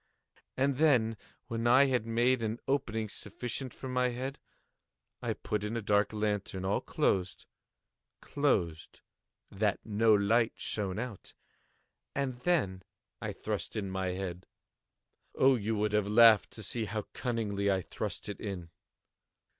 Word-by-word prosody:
And 135 0 +2
then, 125 -8 +4 0.3
when 115 0 -2
I 130 +3 +7
had 125 -4 0
made 120 +2 +2
an 110 0 -1
opening 120 -6 0
sufficient 120 +5 -5
for 130 - -8
my 125 0 +1
head, 130 +3 -4 0.8
I - - -1
put 105 -1 -3
in 110 +2 -2
a - - -2
dark 105 0 +2
lantern, 105 -3 -2
all 95 - +1
closed, 95 -1 0 0.7
closed, 85 - -1 0.5
that 105 0 0
no 110 +1 +3
light 110 +3 +3
shone 100 -3 -3
out, 115 -4 -6 0.8
and 130 -3 -2
then 125 - +1 0.4
I - - -3
thrust - - -4
in 100 -3 -3
my 95 0 -1
head. 90 -1 -4 0.9
Oh, 135 +1 +5
you 110 -1 -1
would 105 0 0
have 105 -1 +2
laughed 110 0 +7
to 110 - -8
see 110 +3 -1
how 105 0 -3
cunningly 105 -5 -1
I 95 -1 0
thrust - - -5
it 105 - -5
in! 90 -5 -5
110 Hz, 140 wpm, -31 LUFS, 100-125 Hz, 0.9 s, I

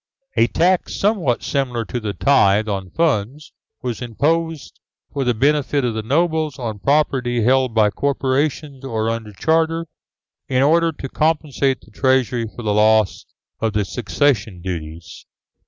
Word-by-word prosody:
A 115 - +4
tax, 180 +6 +1
somewhat 190 - +1
similar 125 -5 -1
to 125 - -4
the 105 -3 -4
tithe 105 -2 +3
on 95 -3 -3
funds, 145 - -1 0.3
was 125 -2 -3
imposed 155 +6 -1 0.3
for 140 - -1
the 125 -2 +1
benefit 140 +2 +1
of 120 - -1
the 110 - -3
nobles 155 +4 0
on 110 -5 -5
property 130 -3 +1
held 130 0 +2
by 105 -2 +4
corporations 140 - -1
or 115 -4 -1
under 115 -2 -5
charter, 160 +9 +1 0.6
in 130 0 +2
order 165 +3 +3
to 145 -3 -7
compensate 150 -3 0
the 110 - -20
treasury 125 -2 +1
for 120 +2 -10
the 105 -1 0
loss 110 -1 +3 0.3
of 110 -1 -1
the 105 -1 0
succession 110 -3 0
duties. 85 -2 -7
130 Hz, 145 wpm, -20 LUFS, 110-150 Hz, 0.6 s, A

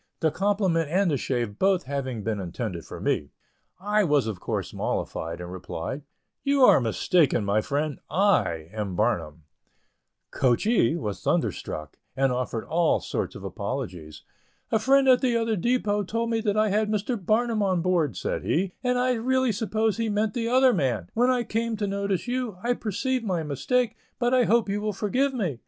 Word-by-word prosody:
The 160 -2 +2
compliment 190 -5 +1
and 185 +1 +2
the 145 - +1
shave 120 -6 -2
both 190 -2 +3
having 130 -5 -4
been 110 -1 -2
intended 90 -1 -5
for - - -8
me, 70 - -1 0.5
I 210 +2 +2
was 145 - +2
of 110 -5 -4
course - - -3
mollified, 85 +1 -3
and 90 0 -7
replied, 95 - -5 0.4
"You 280 -1 +3
are 195 - +7
mistaken, 120 - +2
my 100 +2 +2
friend, 145 +4 -2
I 135 - +2
am 105 -4 -3
Barnum." 85 -7 -1 0.9
"Coachee" 135 - +2
was 105 - -4
thunderstruck, 75 -1 -2 0.2
and 135 -1 +2
offered 125 -2 -2
all 170 0 +2
sorts - - -3
of - - -9
apologies. 80 -4 -5 0.5
"A 220 - +3
friend 270 +4 +4
at 255 -1 +6
the 245 -3 +2
other 225 -1 0
depot 210 0 +1
told 230 +4 -2
me 225 -1 +1
that 210 -1 0
I 215 0 +3
had 210 +1 +1
Mr. 215 +3 -1
Barnum 225 +2 +1
on 185 -4 +1
board," 165 - +1
said - - -2
he, 185 +2 0
"and 250 0 +1
I 250 +1 +2
really 260 +1 +1
supposed 220 +1 -1
he 225 -1 0
meant 210 0 0
the 230 -1 -2
other 255 +1 +5
man. 120 - -1
When 245 +2 +3
I 250 -2 +2
come 230 0 -2
to 205 - -1
notice 200 +1 -2
you, 245 -5 -2
I 245 +1 +2
perceive 245 +3 -2
my 180 -6 -1
mistake, 230 - 0 0.2
but 240 +1 +1
I 250 -2 +4
hope 230 0 +3
you 200 +1 -1
will 210 0 -1
forgive 250 +8 0
me. 175 - -2
195 Hz, 180 wpm, -26 LUFS, -, 0.9 s, are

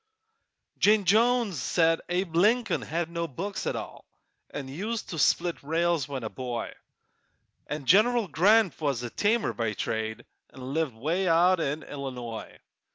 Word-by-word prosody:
Jane 210 -1 +4
Jones 220 - +3
said 165 -1 +2
Abe 175 -1 -1
Lincoln 225 +7 +3
had 165 +1 -2
no 170 0 -3
books 190 +8 -5
at - - -1
all, - - -7 0.5
An' 140 -2 -6
used 205 +11 -4
to 165 - -4
split 170 +4 +2
rails 165 0 0
when 135 -4 -5
a 110 - -3
boy; 120 +1 -5 0.9
An' 150 -2 -5
General 220 - +4
Grant 195 +2 +3
was 140 -5 -1
a 120 - -5
tanner 220 +2 +1
by 115 -2 -2
trade 110 +1 -3 0.2
An' 130 +1 -8
lived 155 -6 -1
'way 165 +11 -1
out 175 +2 +4
in 150 0 -2
Illinois. 125 -5 -7
165 Hz, 150 wpm, -27 LUFS, 135-195 Hz, 0.9 s, Jane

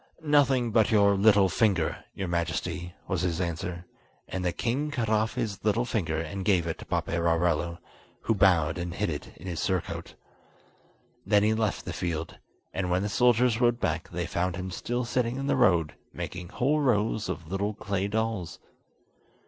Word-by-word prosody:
"Nothing 135 -5 +3
but 110 0 +4
your 100 -3 +5
little 100 -1 +5
finger, 95 -4 +1
your 95 - -3
Majesty," 85 +1 -2
was 95 -3 -1
his 90 -2 -1
answer; 85 0 -3 0.4
and 95 - -4
the 90 - +1
king 130 - -1
cut 120 -6 -2
off 110 +1 +1
his 110 -6 -3
little 110 +3 +2
finger 85 -10 -1
and 80 +4 -4
gave 90 -4 +3
it 80 - -3
to - - -9
Paperarello, 85 0 0 0.5
who - - +2
bowed 90 -5 +3
and 85 0 -4
hid 100 -3 -1
it 75 - -7
in 85 - -12
his 85 -4 -4
surcoat. 95 +3 -2 1.1
Then 105 -1 +3
he 110 +1 +3
left 110 -2 -1
the - - -4
field, 80 -2 -4 0.3
and 95 -2 -2
when 90 +2 +1
the 105 - -1
soldiers 120 +1 +3
rode 120 0 +3
back - - -1
they 85 0 -3
found 85 +1 -1
him 95 0 -5
still 120 +6 -2
sitting 120 0 0
in 135 - -3
the 140 - +2
road 85 -4 +3 0.2
making 90 -1 -6
whole 145 +9 +1
rows 110 -4 +1
of 80 0 -5
little 100 +2 -1
clay 100 +1 -2
dolls. 110 -4 -2
95 Hz, 175 wpm, -28 LUFS, 85-110 Hz, 1.1 s, your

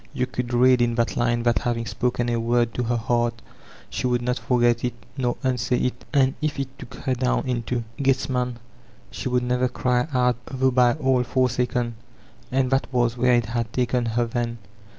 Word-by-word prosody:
You 125 - +1
could 125 -1 -4
read 125 +1 +5
in 120 -1 +2
that 115 -1 0
line 120 0 +1
that 120 -1 +2
having 115 -1 -1
spoken 120 +1 -1
a 120 -1 0
word 120 0 +1
to - - -2
her 120 0 0
heart, 120 0 0 0.5
she - - -1
would 120 -1 0
not 125 +1 -1
forget 120 -2 +2
it 125 -1 -1 0.2
nor 125 -3 -1
unsay 125 -1 +1
it; 125 - -2
and 135 -2 +3
if 150 -2 -1
h 135 - -1
took 130 -1 -10
her 130 +1 -2
down 125 0 0
into 120 -1 -1 0.2
Gethsemane, 130 -2 0 0.5
she - - -4
would 125 0 +1
never 125 +1 +1
cry 125 +2 0
out 125 -2 +2
though 130 0 +1
by 125 -1 +4
all 130 -4 +2
forsaken. 125 -2 0 0.5
And 130 0 +1
that 135 0 +1
was 120 -2 +1
where 125 0 +3
it 120 -2 +2
had 115 0 -2
taken 125 -1 0
her 120 +1 +1
then. 120 0 -2
125 Hz, 190 wpm, -24 LUFS, 120-125 Hz, 0.5 s, read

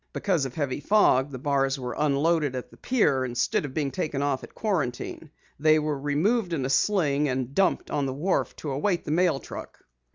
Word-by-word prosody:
Because 175 -8 0
of 130 - -6
heavy 145 -3 -2
fog 145 -6 +3
the 135 - -6
bars 135 0 0
were 125 -2 -4
unloaded 150 0 +1
at 125 - -6
the - - -16
pier 145 - +2
instead 125 +3 0
of 135 - -8
being 145 -3 -1
taken 140 +1 -2
off 140 -2 -1
at - - -12
Quarantine. 160 - -2 0.3
They 155 +1 +5
were 150 -2 -1
removed 170 - +1
in 140 -5 -1
a 135 - -1
sling 145 -2 +2
and 130 0 -2
dumped 190 +4 +1
on 140 -2 0
the 130 - -3
wharf 180 +7 0
to 150 - -5
await 170 +6 0
the - - -3
mail 170 -3 +2
truck." - - -9
145 Hz, 200 wpm, -26 LUFS, 135-165 Hz, 0.3 s, They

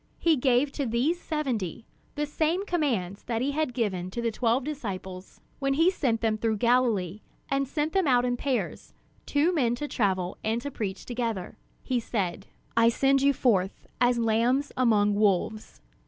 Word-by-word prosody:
He 330 -2 +3
gave 265 +1 +2
to 280 -2 -2
these 260 +10 0
seventy 235 - -3 0.3
the 295 0 -1
same 320 +6 0
commands 235 - -1
that 230 -2 -1
he 265 +4 0
had 305 -1 -1
given 195 -7 -2
to 215 - -6
the 235 -1 0
twelve 235 +3 +1
disciples 190 -10 -6 0.2
when 275 0 +1
he 330 +5 +4
sent 250 -11 0
them 220 -1 0
through 220 -1 0
Galilee, 220 -5 +1 0.3
and 275 0 0
sent 300 +3 -2
them 380 -5 +2
out 250 -2 +4
in 245 0 0
pairs, 260 0 -3 0.3
two 300 +5 +2
men 245 -7 +2
to 295 +4 -4
travel 190 -7 -1
and 220 +2 0
to 285 - -4
preach 195 -6 -4
together. 230 -6 -3 0.3
He 255 -2 0
said: 195 -4 -3 0.3
"I 230 0 +5
send 270 +3 +2
you 280 +1 +5
forth 205 -8 0 0.2
as 245 0 +4
lambs 235 +5 +1
among 210 -5 +3
wolves. 210 +1 0
240 Hz, 170 wpm, -27 LUFS, 215-280 Hz, 0.3 s, I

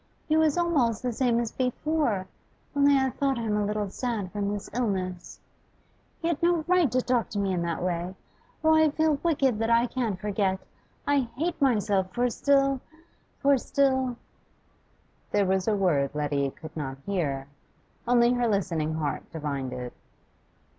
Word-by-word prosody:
He 310 - +2
was 315 0 +3
almost 275 -11 +1
the 250 -1 -1
same 235 -1 +2
as 235 -2 -2
before, 255 -5 0 0.5
only 285 0 +5
I 265 -1 +1
thought 275 -1 0
him 225 -3 -1
a 210 - +1
little 205 -1 -2
sad 220 -7 -3
from 205 -1 -2
his 205 -1 -4
illness. 190 -7 -3 0.8
He 330 - -2
had 335 -4 -1
no 340 -1 +2
right 355 -7 +3
to 255 +1 +1
talk 245 -3 +1
to 210 - -5
me 195 -2 0
in 175 - 0
that 170 0 -2
way! 180 +1 -2 0.5
Oh, 315 0 +5
I 315 0 +5
feel 310 -1 +1
wicked, 275 -9 +1
that 225 0 0
I 235 +1 +4
can't 230 -6 -2
forget; 195 -2 0 0.5
I 280 -4 +1
hate 330 +2 -2
myself 205 -7 +2
for 245 0 +1
still 275 0 +2 0.6
for 280 -1 +4
still 260 -2 +1 0.6
' - - -38
There 205 -1 +3
was 190 +1 0
a 215 - +3
word 150 -8 +1
Letty 145 -2 0
could 160 +3 -11
not 135 -4 -4
hear, 150 -9 -1 0.6
only 240 0 +4
her 245 -1 +1
listening 170 -7 0
heart 155 -2 -3
divined 140 -5 -3
it. 125 -1 -6
225 Hz, 165 wpm, -27 LUFS, 185-275 Hz, 0.8 s, only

